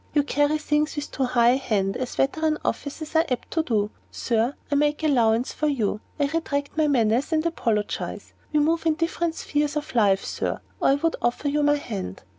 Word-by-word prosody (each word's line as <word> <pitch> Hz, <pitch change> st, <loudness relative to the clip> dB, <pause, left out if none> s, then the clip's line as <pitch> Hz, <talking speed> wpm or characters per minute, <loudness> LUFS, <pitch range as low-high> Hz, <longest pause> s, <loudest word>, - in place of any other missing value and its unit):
You 290 Hz, -, +4 dB
carry 290 Hz, +1 st, +1 dB
things 300 Hz, 0 st, 0 dB
with 295 Hz, 0 st, -5 dB
too 270 Hz, -, 0 dB
high 240 Hz, -1 st, +4 dB
a 255 Hz, -, +3 dB
hand, 200 Hz, -7 st, 0 dB
as 255 Hz, -1 st, -4 dB
veteran 310 Hz, +3 st, +1 dB
officers 310 Hz, +2 st, -4 dB
are 320 Hz, -, +5 dB
apt 250 Hz, -2 st, -3 dB
to 325 Hz, -, +1 dB
do. 215 Hz, -7 st, 0 dB, 0.2 s
Sir, 235 Hz, +3 st, 0 dB, 0.2 s
I -, -, +2 dB
make 295 Hz, +2 st, +1 dB
allowance 240 Hz, -5 st, +2 dB
for 305 Hz, -, -1 dB
you; 220 Hz, -7 st, 0 dB, 0.2 s
I 285 Hz, -, +3 dB
retract 285 Hz, -2 st, -2 dB
my 310 Hz, -1 st, +2 dB
menace, 245 Hz, +1 st, +2 dB
and 315 Hz, 0 st, +1 dB
apologize. 225 Hz, -11 st, -2 dB, 0.2 s
We 300 Hz, -, +3 dB
move 325 Hz, +2 st, +1 dB
in 315 Hz, -, +3 dB
different 335 Hz, 0 st, -1 dB
spheres 295 Hz, -1 st, -1 dB
of 300 Hz, 0 st, -4 dB
life, 200 Hz, -5 st, +3 dB
Sir, -, -, -3 dB, 0.2 s
or -, -, +2 dB
I 275 Hz, -, +5 dB
would 325 Hz, +3 st, 0 dB
offer 245 Hz, +4 st, 0 dB
you 295 Hz, +1 st, +1 dB
my 290 Hz, 0 st, +4 dB
hand." 205 Hz, -, -5 dB
285 Hz, 205 wpm, -24 LUFS, 240-305 Hz, 0.2 s, are